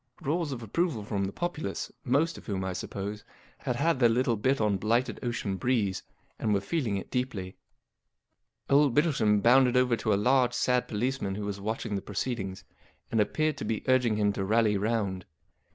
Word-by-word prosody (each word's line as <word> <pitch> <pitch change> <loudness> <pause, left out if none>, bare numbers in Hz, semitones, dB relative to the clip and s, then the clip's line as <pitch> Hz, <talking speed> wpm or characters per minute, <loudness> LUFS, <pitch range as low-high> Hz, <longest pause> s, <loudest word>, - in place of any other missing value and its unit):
" - - -27
Roars 160 +1 -1
of 120 -3 -5
approval 130 - -1
front 100 -2 -2
the - - -5
populace, 175 +4 -4
most 145 +6 +1
of - - -12
whom, 95 -3 -2
I 95 - -2
suppose, 100 +3 -5 0.4
had 125 - -2
had 165 +2 +1
their 120 -2 +5
little 120 0 +2
bit 130 +6 +1
on 105 -3 +2
blighted 115 +6 0
Ocean 115 -5 -2
Breeze, 105 -4 0 0.4
and 105 -2 +1
were - - +2
feeling 110 - -1
it 95 - -7
deeply 115 -8 -3 1.1
Old 140 -2 +4
Bittlesham 125 -10 +3
bounded 125 +1 +5
over 125 -1 +3
to 110 - -1
a - - +4
large, 125 +4 +3
sad 125 -1 +1
policeman 110 -2 -2
who 105 0 -4
was 100 -1 -4
watching 110 0 -3
the 100 - -2
proceedings, 100 -2 -4 0.5
and 115 - +3
appeared 155 +7 0
to - - -5
be 110 0 -2
urging 125 -4 +3
him 105 -1 +2
to 100 - -2
rally 110 +1 +3
round. 100 -3 -1
115 Hz, 185 wpm, -28 LUFS, 100-130 Hz, 1.1 s, their